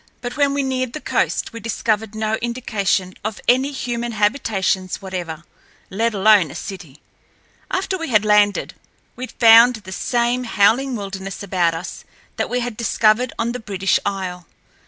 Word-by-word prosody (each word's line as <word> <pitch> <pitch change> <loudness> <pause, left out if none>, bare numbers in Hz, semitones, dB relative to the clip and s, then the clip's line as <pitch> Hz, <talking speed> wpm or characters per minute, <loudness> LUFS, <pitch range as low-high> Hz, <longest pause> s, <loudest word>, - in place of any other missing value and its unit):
But 245 0 -6
when 280 -1 +2
we 285 - 0
neared 255 -2 -2
the 310 - -5
coast - - -1
we 230 - -7
discovered 220 -1 -2
no 215 0 -1
indication 210 -6 -1
of 215 -1 -4
any 260 +3 +3
human 240 -3 -3
habitations 205 -4 0
whatever, 175 -4 -6 0.5
let 225 +3 0
alone 200 -4 +5
a - - -10
city. 170 -8 -8 0.7
After 375 0 -2
we 330 - -4
had 215 -3 +3
landed, 210 -1 +3 0.4
we 255 +1 -6
found 230 +1 +6
the 205 -4 -11
same 240 +5 0
howling 235 +5 +2
wilderness 195 -2 -6
about 175 -4 +1
us 165 +3 -7 0.3
that - - -1
we 250 0 -1
had 240 -3 -4
discovered 230 +1 +2
on 230 +1 -1
the 250 - -5
British 195 -3 0
Isle. 185 -3 -4
220 Hz, 155 wpm, -20 LUFS, 195-245 Hz, 0.7 s, found